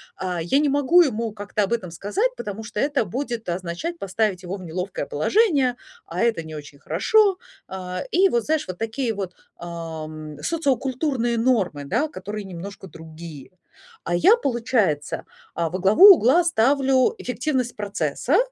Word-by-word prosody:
а, 180 -2 -3
я 220 - +2
не 295 -1 +2
могу 285 +5 +5
ему 230 -8 0
как-то 205 0 -2
об 215 +4 -1
этом 185 -7 -3
сказать, 380 - -1
потому 210 0 -6
что 210 -1 -6
это 280 -1 +1
будет 235 0 -4
означать 180 - -4
поставить 195 -1 -1
его 180 +2 -4
в 190 - -9
неловкое 180 -1 -4
положение, 275 - +2 0.3
а - - -4
это 225 -8 +1
не 160 0 -9
очень 145 -1 -10
хорошо. 380 - +3 0.3
А, 185 -1 -5
и 380 +3 +4
вот, 235 -7 0
знаешь, 315 0 0
вот 185 -1 -6
такие 225 +2 -2
вот, 195 -3 -5 0.2
ам, 155 -3 -7
социокультурные 265 -5 0
нормы, 215 - +1
да, 300 - 0
которые 205 -5 -7
немножко 190 +2 -8
другие. 160 -3 -11 0.5
А 175 - 0
я, 420 - +6
получается, 235 - 0 0.3
а, 165 -1 -1
во 185 - -4
главу 215 - +9
угла 325 +7 +4
ставлю 265 -2 +3
эффективность 250 -1 -2
процесса, 205 - -1
215 Hz, 155 wpm, -23 LUFS, 175-270 Hz, 0.5 s, главу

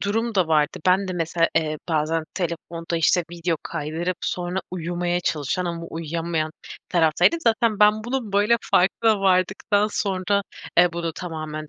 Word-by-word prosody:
durum 225 +3 -1
da 180 -4 +2
vardı. 150 -1 +2
Ben 190 +1 +3
de 185 - -2
mesela, 165 -1 +1
eee, 155 -2 0
bazen 160 0 0
telefonda, 170 -1 -3
işte, 165 +2 +3
video 170 -1 -1
kaydırıp 165 +4 -3
sonra 180 +1 -2
uyumaya 175 0 -2
çalışan 155 +3 -1
ama 170 -1 -4
uyuyamayan 165 0 -3 0.4
taraftaydım. 165 - +3
Zaten 225 -5 +1
ben 210 +1 +5
bunun 240 -5 -3
böyle 210 +4 +4 0.2
farkına 205 +3 +3
vardıktan 190 +2 +2
sonra, 200 -1 0 0.4
eee, 175 -1 +6
bunu 170 -1 -3
tamamen 155 -3 -6
175 Hz, 145 wpm, -23 LUFS, 165-200 Hz, 0.4 s, eee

